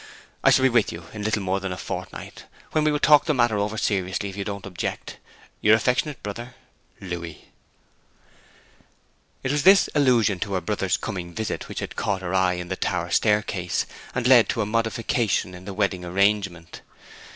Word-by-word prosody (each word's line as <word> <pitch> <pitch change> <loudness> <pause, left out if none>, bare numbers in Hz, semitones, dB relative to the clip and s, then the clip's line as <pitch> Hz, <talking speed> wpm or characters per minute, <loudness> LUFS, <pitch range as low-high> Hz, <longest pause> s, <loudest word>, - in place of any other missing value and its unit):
I - - +6
shall 130 - +4
be 130 - +6
with 120 -3 +2
you 85 0 -9
in 105 - -6
little 105 -1 -1
more 95 +1 0
than 95 -1 -4
a 90 - -4
fortnight, - - -7 0.3
when 155 - +1
we 155 - +3
will 150 - +1
talk 150 0 +6
over - - -18
the 155 - +3
matter 110 -3 +1
seriously, 95 -1 -1
if 95 - -9
you 100 - -3
don't 100 -1 -6
object. 95 -2 -5 0.4
Your 105 +1 +6
affectionate 125 +4 0
brother, 120 +4 -6 0.5
LOUIS.' 85 -4 -5 2.1
It 130 - 0
was 145 0 +1
this 195 +4 +6
allusion 120 -9 +3
to 100 - -3
her 95 - 0
brother's 85 - -1
coming 85 -3 -6
visit 110 - -3
which - - -5
had - - -6
caught 95 -1 -2
her 90 0 -3
eye 95 -1 +3
in 90 0 -6
the 95 - -1
tower 85 -2 -2
staircase, 105 -3 +1 0.3
and 125 -1 -1
led 125 -3 +6
to 115 - 0
a - - -3
modification 115 -2 0
in 90 0 -11
the 100 - -6
wedding 100 -3 0
arrangement. 95 -2 0
100 Hz, 185 wpm, -24 LUFS, 95-115 Hz, 2.1 s, I